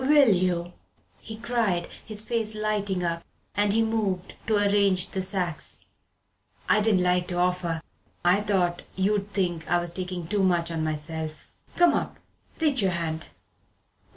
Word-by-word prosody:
"Will 280 -5 +6
you?" 180 -1 0 0.5
he 220 - -7
cried, 220 -6 0 0.2
his 215 -1 -2
face 220 -2 -1
lighting 205 -3 -1
up 170 -1 -1 0.3
as 205 0 +2
he 225 +2 +3
moved 205 -5 -1
to 220 - +3
arrange 200 -2 +3
the 190 - -1
sacks. 185 -4 -3 0.9
"I 215 - +4
didn't 205 -4 +3
like 180 0 +2
to 175 - -2
offer. 175 -2 0 0.4
I 180 +4 +5
thought 185 -4 +1
you'd 200 +1 0
think 175 -5 -1
I 175 - +4
was 175 0 -3
takin' 180 -1 -4
too 200 +4 0
much 175 -3 +2
on 160 -1 -1
myself. 155 0 -4 0.2
Come 350 -1 +5
up - - -2 0.4
reach 300 -4 +2
me 195 - +3
your - - +1
hand. 160 - -3
185 Hz, 155 wpm, -26 LUFS, 175-210 Hz, 0.9 s, Will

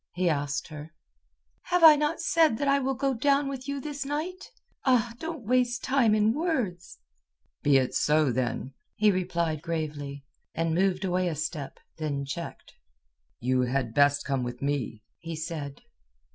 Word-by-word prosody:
he 180 0 0
asked 145 -3 -1
her. 155 0 -10 0.7
"Have 355 -1 +1
I 315 -2 +11
not 300 +2 0
said 320 -8 +3
that 285 - -1
I 275 0 +4
will 270 0 -1
go 270 +1 0
down 280 +3 +2
with 270 -1 -5
you 280 0 -2
this 285 0 -5
night? 310 +7 -4 0.3
Ah, 240 -3 +2
don't 320 -7 -6
waste 245 +1 +1
time 255 -5 +3
in 215 +1 +3
words!" 235 - -2 0.6
"Be 145 -1 +5
it 130 -1 0
so, 150 -2 +3
then," 130 +2 -2 0.2
he 210 0 +4
replied 170 -4 -1
gravely, 150 -4 -4 0.3
and 165 0 0
moved 190 +2 +1
away 180 0 +1
a 165 - -2
step, 155 -2 -5 0.2
then 140 -3 -2
checked. 165 +5 -7 0.7
"You 130 +1 +1
had 125 -2 -1
best 145 +1 +3
come 135 -2 0
with 120 0 -5
me," 140 -6 -2 0.2
he 165 0 -6
said. 155 -3 -6
175 Hz, 160 wpm, -27 LUFS, -, 0.7 s, I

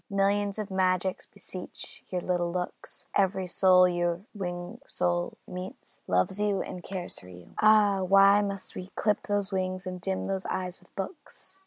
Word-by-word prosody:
Millions 200 0 +1
of 210 -2 -4
magics 185 0 +1
beseech 185 -2 -9
your 180 -1 -1
little 175 -1 0
looks; 180 0 -5
Every 190 -1 +2
soul 185 0 +6
your 175 0 0
winged 180 +3 -5
soul 175 0 -1
meets, 180 +1 -8
loves 90 - +1
you 205 -2 +1
and 180 - -7
cares 185 -2 -5
for 90 - -13
you. 90 -1 -13
Ah! 210 -2 +6
why 195 +2 +6
must 200 -2 -4
we 185 - -6
clip 210 -1 +1
those 205 -1 0
wings 185 -1 -2
and 180 -1 -5
dim 190 +1 -1
those 190 -1 -2
eyes 180 -1 -3
with - - -26
books? 345 - -7
190 Hz, 165 wpm, -29 LUFS, 180-200 Hz, -, soul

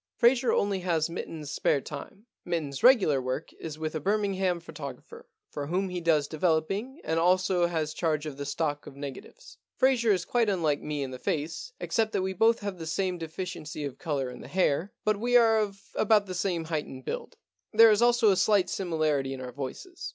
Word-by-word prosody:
Fraser 245 0 +4
only 200 -1 +1
has 170 -3 0
Mitten's 155 -3 -6
spare 145 - +2
time. 150 - -9 0.2
Mitten*s 155 -6 -3
regular 195 - +5
work 130 +5 -4
is 155 -2 -6
with 155 0 -3
a 155 - -2
Birmingham 195 -1 0
photographer, 150 -6 -9 0.2
for 145 -1 -4
whom 185 +4 0
he 180 -1 -4
does 155 -4 +2
developing 180 - -1
and 160 +1 0
also 180 0 +3
has 160 -3 -2
charge 155 -2 -1
of 150 -3 -5
the 140 - -4
stock 145 0 -2
of 135 - -10
negatives. 305 - -9 0.2
Fraser 250 -4 +3
is 185 -3 +1
quite 235 -3 +2
unlike 160 -7 +1
me 150 -2 -3
in 130 - -5
the 130 - -7
face, 160 - -3
except 220 -1 0
that 185 - +1
we 190 0 -2
both 225 +4 +3
have 200 -3 -4
the 160 - -6
same 180 +2 -1
deficiency 165 -2 -5
of 140 - -7
colour 140 -6 -2
in - - -10
the - - -10
hair, 175 +3 +1
but 215 -1 +2
we 245 +2 +4
are 225 -2 +5
of 200 -2 -2
about 215 -1 +3
the 185 - -6
same 175 -2 -1
height 160 -2 -2
and 130 -1 -10
build. - - -5 0.3
There 225 +1 +8
is 210 +1 +3
also 240 -3 +5
a 190 - +2
slight 195 -1 +3
similarity 155 -7 0
in - - -9
our 125 -1 -6
voices. 350 - -7
175 Hz, 205 wpm, -28 LUFS, 150-205 Hz, 0.3 s, There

